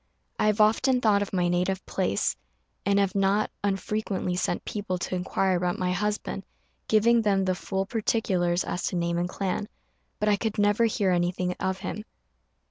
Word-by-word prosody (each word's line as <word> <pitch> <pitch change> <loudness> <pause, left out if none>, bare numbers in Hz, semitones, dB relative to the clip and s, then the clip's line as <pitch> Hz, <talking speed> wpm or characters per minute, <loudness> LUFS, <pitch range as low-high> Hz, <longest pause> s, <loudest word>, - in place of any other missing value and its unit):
I - - +3
have 210 0 +2
often 250 +5 +4
thought 210 -4 +3
of 205 - -3
my 180 -2 +1
native 180 +2 0
place, 180 - 0 0.5
and 200 0 +3
have 200 -2 +2
not 200 +2 +2
unfrequently 195 -1 -1
sent 180 - -1
people 200 -3 -3
to 180 - -4
inquire 185 +1 0
about 175 0 0
my 180 0 0
husband, 205 +1 -2 0.4
giving 230 +2 +4
them 195 -3 +2
the 185 - +2
full 190 +1 -2
particulars 190 -5 0
as 180 - -3
to - - -3
name 170 0 0
and 175 +1 -1
clan; 195 +2 -2 0.5
but 210 - 0
I 205 -1 +4
could 220 +1 -2
never 205 +2 +3
hear 205 -4 +1
anything 180 0 0
of 190 0 -1
him. 210 +2 -4
195 Hz, 175 wpm, -27 LUFS, 180-210 Hz, 0.5 s, often